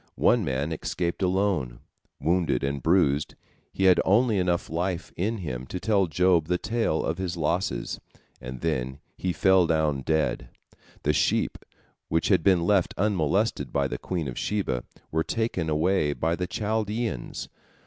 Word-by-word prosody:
One -, -, +4 dB
man 70 Hz, +4 st, -1 dB
escaped 85 Hz, +3 st, -3 dB
alone. 90 Hz, -10 st, 0 dB, 0.4 s
Wounded 80 Hz, -4 st, +1 dB
and 70 Hz, 0 st, -1 dB
bruised, 75 Hz, -4 st, +2 dB, 0.4 s
he 95 Hz, -, -2 dB
had 95 Hz, -2 st, +6 dB
only 110 Hz, +1 st, +3 dB
enough 90 Hz, -1 st, 0 dB
life 90 Hz, +1 st, -3 dB
in 110 Hz, +6 st, -1 dB
him 65 Hz, -, -5 dB
to 90 Hz, -, -5 dB
tell 100 Hz, -3 st, +2 dB
Job 85 Hz, 0 st, +2 dB
the 90 Hz, +1 st, +1 dB
tale 110 Hz, -6 st, 0 dB
of 85 Hz, +3 st, -2 dB
his 90 Hz, -2 st, -3 dB
losses, 85 Hz, +4 st, -1 dB, 0.4 s
and 65 Hz, 0 st, -7 dB
then 65 Hz, -5 st, -1 dB, 0.2 s
he 90 Hz, -, -2 dB
fell 95 Hz, -1 st, +4 dB
down 80 Hz, -4 st, +1 dB
dead. 80 Hz, +2 st, 0 dB, 0.5 s
The 75 Hz, -, +2 dB
sheep, -, -, +1 dB, 0.5 s
which 80 Hz, +1 st, +1 dB
had 95 Hz, -4 st, +4 dB
been 90 Hz, 0 st, +3 dB
left 95 Hz, 0 st, +2 dB
unmolested 100 Hz, +1 st, +1 dB
by 70 Hz, -1 st, +1 dB
the -, -, -5 dB
queen 85 Hz, -5 st, -3 dB
of 60 Hz, -, -5 dB
Sheba, 80 Hz, -13 st, -1 dB, 0.3 s
were 80 Hz, +1 st, +1 dB
taken 90 Hz, -2 st, -1 dB
away 75 Hz, -1 st, +2 dB
by 80 Hz, +3 st, 0 dB
the 90 Hz, +1 st, -3 dB
Chaldeans. 110 Hz, -, -2 dB
85 Hz, 155 wpm, -26 LUFS, 75-95 Hz, 0.5 s, had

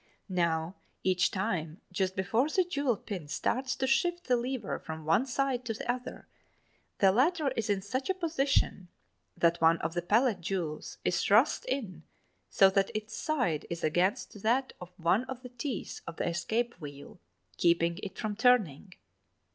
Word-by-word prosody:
Now, 170 Hz, -1 st, 0 dB, 0.3 s
each 185 Hz, -1 st, +3 dB
time 180 Hz, -5 st, -2 dB
just 190 Hz, 0 st, -1 dB
before 225 Hz, +9 st, +1 dB
the 370 Hz, +4 st, +3 dB
jewel 285 Hz, -, 0 dB
pin 185 Hz, -9 st, -6 dB
starts 255 Hz, -, -1 dB
to 265 Hz, -, -1 dB
shift 345 Hz, +7 st, +1 dB
the 250 Hz, -, +3 dB
lever 250 Hz, +1 st, -2 dB
from 160 Hz, -1 st, -7 dB
one 210 Hz, -, +3 dB
side 265 Hz, -1 st, 0 dB
to 225 Hz, -2 st, -2 dB
the -, -, -7 dB
other, 250 Hz, 0 st, -7 dB, 0.7 s
the 195 Hz, -1 st, +5 dB
latter 295 Hz, -, +2 dB
is 230 Hz, -5 st, -3 dB
in 195 Hz, -2 st, +1 dB
such 260 Hz, -, -3 dB
a 380 Hz, -, +2 dB
position 285 Hz, -, 0 dB, 0.5 s
that 170 Hz, 0 st, +2 dB
one 165 Hz, +1 st, +5 dB
of 165 Hz, -, -3 dB
the 175 Hz, -, -1 dB
pallet 215 Hz, +2 st, +2 dB
jewels 170 Hz, -4 st, -3 dB
is 175 Hz, -1 st, +1 dB
thrust 220 Hz, +9 st, +4 dB
in 220 Hz, -, -3 dB, 0.5 s
so 195 Hz, -, +6 dB
that 195 Hz, 0 st, +2 dB
its 215 Hz, 0 st, -4 dB
side 245 Hz, -, -1 dB
is 170 Hz, 0 st, -5 dB
against 180 Hz, +5 st, 0 dB
that 250 Hz, +5 st, +1 dB
of 180 Hz, -, -8 dB
one 175 Hz, +6 st, +2 dB
of 260 Hz, -1 st, -7 dB
the 250 Hz, -, -8 dB
teeth 245 Hz, -2 st, -5 dB
of 165 Hz, -, -6 dB
the -, -, -2 dB
escape 225 Hz, +8 st, -1 dB
wheel, 145 Hz, +3 st, -10 dB, 0.4 s
keeping 170 Hz, 0 st, +2 dB
it 195 Hz, -1 st, -7 dB
from 215 Hz, -2 st, -3 dB
turning. 210 Hz, -, +2 dB
205 Hz, 170 wpm, -30 LUFS, 175-255 Hz, 0.7 s, so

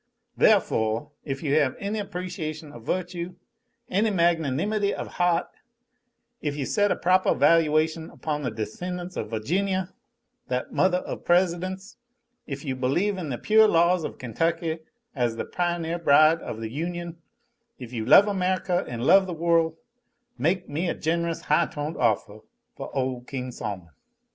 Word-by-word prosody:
The'foh, 115 Hz, -, +2 dB
if 135 Hz, 0 st, -5 dB
you 145 Hz, -2 st, 0 dB
have 135 Hz, -4 st, +1 dB
any 205 Hz, +2 st, -3 dB
appreciation 175 Hz, -6 st, -5 dB
of 120 Hz, -, -11 dB
virtue, 175 Hz, +2 st, -3 dB, 0.5 s
any 210 Hz, +4 st, +1 dB
magnanimity 175 Hz, +3 st, +1 dB
of -, -, -7 dB
heaht; 175 Hz, -1 st, +2 dB, 1.0 s
if 145 Hz, -2 st, -2 dB
you 145 Hz, -2 st, -2 dB
set 205 Hz, +5 st, +2 dB
a -, -, +2 dB
propah 185 Hz, +1 st, +2 dB
valuation 160 Hz, 0 st, +3 dB
upon 150 Hz, -2 st, -4 dB
the 130 Hz, -, -1 dB
descendants 175 Hz, -, -5 dB
of -, -, -4 dB
Virginia, 185 Hz, -, -1 dB, 0.5 s
that 125 Hz, 0 st, -2 dB
mothah 185 Hz, -1 st, +2 dB
of -, -, -6 dB
Presidents; 185 Hz, +3 st, 0 dB, 0.5 s
if 140 Hz, +1 st, -6 dB
you 135 Hz, -2 st, -2 dB
believe 175 Hz, +11 st, 0 dB
in 165 Hz, -5 st, -4 dB
the 125 Hz, -, -2 dB
pure 220 Hz, -, +5 dB
laws 170 Hz, -1 st, +3 dB
of -, -, -5 dB
Kentucky 165 Hz, +6 st, -1 dB, 0.4 s
as 120 Hz, -3 st, 0 dB
the -, -, -4 dB
pioneer 175 Hz, -1 st, -2 dB
bride 155 Hz, +1 st, +5 dB
of 110 Hz, -, -6 dB
the 110 Hz, -1 st, -5 dB
Union; 170 Hz, +3 st, -4 dB, 0.6 s
if 125 Hz, -1 st, -9 dB
you 115 Hz, -2 st, -2 dB
love 200 Hz, -, +7 dB
America 185 Hz, -2 st, 0 dB
an' 120 Hz, -1 st, -5 dB
love 190 Hz, +9 st, +5 dB
the 180 Hz, -, -4 dB
worl' 165 Hz, -1 st, +2 dB, 0.6 s
make 175 Hz, +8 st, 0 dB
me 165 Hz, +5 st, -2 dB
a -, -, -1 dB
gen'rous, 170 Hz, +1 st, -1 dB
high 150 Hz, -, +2 dB
toned 150 Hz, +2 st, -5 dB
offah 105 Hz, 0 st, 0 dB, 0.3 s
foh -, -, -7 dB
ole 130 Hz, -2 st, -1 dB
King 125 Hz, 0 st, -5 dB
Sol'mon!" 95 Hz, -7 st, -6 dB
165 Hz, 155 wpm, -25 LUFS, 135-180 Hz, 1.0 s, love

